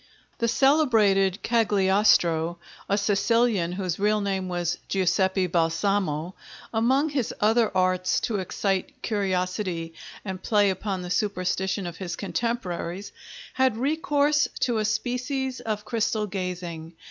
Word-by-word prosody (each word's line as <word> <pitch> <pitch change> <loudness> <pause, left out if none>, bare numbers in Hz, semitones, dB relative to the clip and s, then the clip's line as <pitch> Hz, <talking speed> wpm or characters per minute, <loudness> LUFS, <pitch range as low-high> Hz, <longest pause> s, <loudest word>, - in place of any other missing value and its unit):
The 230 - +1
celebrated 225 - +3
Cagliostro, 190 -6 +3 0.3
a 200 - +2
Sicilian 205 -2 +2
whose 180 -2 -3
real 210 +1 +2
name 195 -2 -2
was 175 -1 -2
Giuseppe 190 0 +1
Balsamo, 170 0 0 0.4
among 260 +7 +2
his 275 -6 -1
other 220 +1 +3
arts 185 0 +2
to 220 - -1
excite 195 +7 -2
curiosity 185 -4 -2 0.3
and 190 -2 -5
play 205 -2 +3
upon 190 -1 -3
the 180 - -6
superstition 190 -1 -1
of 175 -1 -6
his 175 -2 -4
contemporaries, 195 -4 -3 0.4
had 260 -4 +2
recourse 295 +1 +2
to 240 -3 +1
a 215 - 0
species 250 +4 -2
of 210 -1 -4
crystal 220 -2 0
gazing. 180 -4 -5
200 Hz, 120 wpm, -25 LUFS, 185-230 Hz, 0.4 s, celebrated